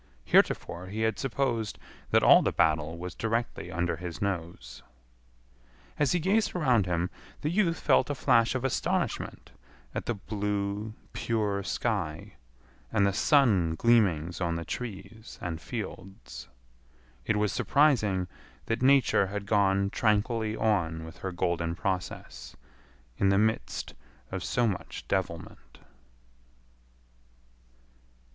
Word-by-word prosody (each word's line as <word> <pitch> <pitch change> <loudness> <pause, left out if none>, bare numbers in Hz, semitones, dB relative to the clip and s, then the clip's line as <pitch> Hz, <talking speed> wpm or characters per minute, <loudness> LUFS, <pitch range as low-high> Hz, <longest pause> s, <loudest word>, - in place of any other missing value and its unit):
Heretofore 90 +2 +2
he 105 +4 -4
had 110 0 0
supposed 120 -4 -1 0.3
that - - +4
all - - +8
the - - +1
battle 80 +1 +1
was 90 +1 -6
directly 115 +1 -2
under 85 +1 -1
his 85 -1 -6
nose. 90 -4 -4 1.2
As 145 -2 +3
he 180 - +2
gazed 195 +6 +1
around 125 - +2
him 90 +1 -1 0.3
the 150 - -1
youth 175 -3 +1
felt - - +3
a 145 - -1
flash 115 -1 +3
of 130 0 -1
astonishment 135 - -2 0.4
at - - -4
the 120 - 0
blue, 105 +1 -3 0.2
pure 105 -3 -1
sky 75 -4 -2 0.6
and 100 -3 +3
the 100 - +2
sun 100 - +3
gleamings 90 -7 +2
on 85 -1 0
the 85 0 -4
trees 110 -1 -7
and 85 -2 -5
fields. 95 - -7 0.8
It 110 - +2
was 105 -2 +1
surprising 110 -11 +2 0.4
that 115 +1 -2
Nature 130 -7 +4
had 100 +1 -5
gone 100 -1 +2
tranquilly 110 0 +1
on 85 -8 0
with 80 +2 -11
her 95 +1 -4
golden 85 -1 -1
process 90 -9 -4 0.6
in 100 - +4
the 95 - +3
midst 105 - -1 0.4
of 95 -1 -4
so 120 - +1
much 100 -5 -4
devilment. 95 -4 -4
100 Hz, 125 wpm, -28 LUFS, 90-115 Hz, 1.2 s, all